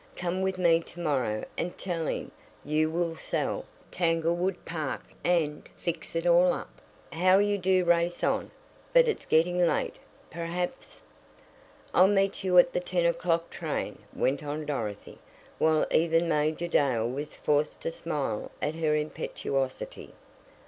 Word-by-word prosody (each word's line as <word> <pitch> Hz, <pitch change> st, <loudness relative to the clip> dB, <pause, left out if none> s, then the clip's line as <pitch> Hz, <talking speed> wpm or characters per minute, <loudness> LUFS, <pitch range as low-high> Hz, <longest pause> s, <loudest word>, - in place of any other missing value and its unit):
Come 180 Hz, +1 st, -2 dB
with 190 Hz, 0 st, 0 dB
me 170 Hz, -2 st, +4 dB
to 170 Hz, +1 st, -12 dB
morrow 130 Hz, -10 st, 0 dB
and 175 Hz, -, -3 dB
tell 170 Hz, -4 st, -3 dB
him -, -, -3 dB, 0.3 s
you 155 Hz, +2 st, +2 dB
will 170 Hz, 0 st, -1 dB
sell -, -, -2 dB, 0.3 s
Tanglewood 170 Hz, +2 st, 0 dB
Park 155 Hz, -5 st, -3 dB, 0.2 s
and 160 Hz, -4 st, 0 dB
fix 170 Hz, -1 st, -4 dB
it 165 Hz, +1 st, -1 dB
all 175 Hz, +1 st, +5 dB
up -, -, -8 dB, 0.2 s
" -, -, -18 dB
"How 185 Hz, +1 st, +7 dB
you 205 Hz, 0 st, +2 dB
do 185 Hz, 0 st, +2 dB
race 175 Hz, 0 st, +2 dB
on! -, -, +1 dB, 0.4 s
But -, -, +6 dB
it's 450 Hz, -, -2 dB
getting 175 Hz, +3 st, +3 dB
late. 170 Hz, -, 0 dB, 0.3 s
Perhaps 175 Hz, +7 st, -4 dB, 0.5 s
" -, -, -27 dB
"I'll 185 Hz, -, +7 dB
meet 195 Hz, 0 st, +1 dB
you 185 Hz, -1 st, +3 dB
at 175 Hz, -, +7 dB
the -, -, +1 dB
ten 180 Hz, -1 st, 0 dB
o'clock 170 Hz, 0 st, +1 dB
train," -, -, -4 dB, 0.2 s
went 140 Hz, +3 st, 0 dB
on 150 Hz, +1 st, -4 dB
Dorothy, 110 Hz, -9 st, -4 dB, 0.4 s
while 155 Hz, -1 st, +3 dB
even 165 Hz, +1 st, +3 dB
Major 155 Hz, +2 st, 0 dB
Dale 130 Hz, -8 st, +2 dB
was 140 Hz, +5 st, -4 dB
forced 150 Hz, 0 st, 0 dB
to -, -, -2 dB
smile 145 Hz, -10 st, -3 dB
at 150 Hz, -, -1 dB
her 160 Hz, -2 st, +1 dB
impetuosity. 135 Hz, -3 st, -3 dB
165 Hz, 150 wpm, -28 LUFS, 150-180 Hz, 0.5 s, How